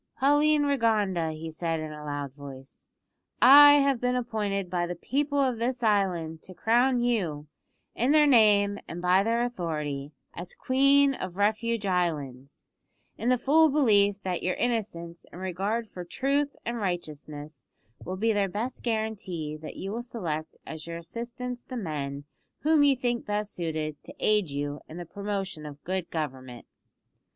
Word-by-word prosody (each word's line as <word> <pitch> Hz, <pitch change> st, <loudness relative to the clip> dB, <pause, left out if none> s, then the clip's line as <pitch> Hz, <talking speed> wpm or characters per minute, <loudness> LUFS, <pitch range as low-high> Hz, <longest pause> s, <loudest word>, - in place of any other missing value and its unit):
"Pauline 290 Hz, +3 st, +4 dB
Rigonda," 215 Hz, -, +1 dB
he 160 Hz, +1 st, -7 dB
said 165 Hz, 0 st, -2 dB
in 155 Hz, 0 st, -5 dB
a 150 Hz, 0 st, -9 dB
loud 145 Hz, -2 st, -4 dB
voice, 135 Hz, -1 st, -12 dB, 0.5 s
"I 290 Hz, +3 st, +10 dB
have 275 Hz, -3 st, +3 dB
been 250 Hz, 0 st, +1 dB
appointed 210 Hz, -6 st, -2 dB
by 175 Hz, -1 st, -1 dB
the 175 Hz, -, -4 dB
people 285 Hz, -, -1 dB
of 255 Hz, -4 st, +1 dB
this 245 Hz, +1 st, -2 dB
island 180 Hz, -7 st, +1 dB
to 185 Hz, -, -12 dB
crown 245 Hz, +4 st, +2 dB
you, 180 Hz, -12 st, -1 dB, 0.5 s
in 250 Hz, +4 st, +1 dB
their 300 Hz, 0 st, +6 dB
name 210 Hz, -6 st, +4 dB
and 170 Hz, -, -6 dB
by 180 Hz, +2 st, +4 dB
their 230 Hz, +3 st, +1 dB
authority, 150 Hz, -, -3 dB, 0.2 s
as 175 Hz, +1 st, -8 dB
Queen 275 Hz, +1 st, +4 dB
of 185 Hz, -7 st, -6 dB
Refuge 215 Hz, +1 st, 0 dB
Islands, 150 Hz, -8 st, -2 dB, 0.5 s
in 235 Hz, -, -1 dB
the 255 Hz, -, +4 dB
full 310 Hz, +6 st, +4 dB
belief 205 Hz, -8 st, +3 dB
that 185 Hz, -2 st, -2 dB
your 185 Hz, -, -1 dB
innocence 195 Hz, -8 st, -3 dB
and 175 Hz, -, -10 dB
regard 195 Hz, +5 st, -2 dB
for 180 Hz, -3 st, -8 dB
truth 280 Hz, +9 st, -1 dB
and 235 Hz, +1 st, -2 dB
righteousness 155 Hz, -6 st, -5 dB, 0.4 s
will 185 Hz, +2 st, -5 dB
be 225 Hz, +3 st, +2 dB
their 200 Hz, -2 st, +1 dB
best 230 Hz, +7 st, -4 dB
guarantee 205 Hz, -9 st, -3 dB
that 155 Hz, 0 st, -9 dB
you 195 Hz, -, -5 dB
will 230 Hz, +3 st, -3 dB
select 165 Hz, -10 st, -5 dB
as 160 Hz, 0 st, -7 dB
your 170 Hz, 0 st, -5 dB
assistants 240 Hz, +7 st, -6 dB
the 255 Hz, -, -7 dB
men 145 Hz, -8 st, -4 dB, 0.4 s
whom 310 Hz, 0 st, +4 dB
you 285 Hz, -1 st, +5 dB
think 240 Hz, -2 st, -2 dB
best 210 Hz, 0 st, -2 dB
suited 155 Hz, -3 st, -3 dB
to -, -, -11 dB
aid 210 Hz, -5 st, +2 dB
you 145 Hz, +1 st, -4 dB
in 160 Hz, -, -9 dB
the 175 Hz, -, -6 dB
promotion 195 Hz, -3 st, -4 dB
of 145 Hz, -1 st, -10 dB
good 185 Hz, -1 st, -3 dB
government." 130 Hz, -6 st, -5 dB
200 Hz, 160 wpm, -27 LUFS, 160-240 Hz, 0.5 s, I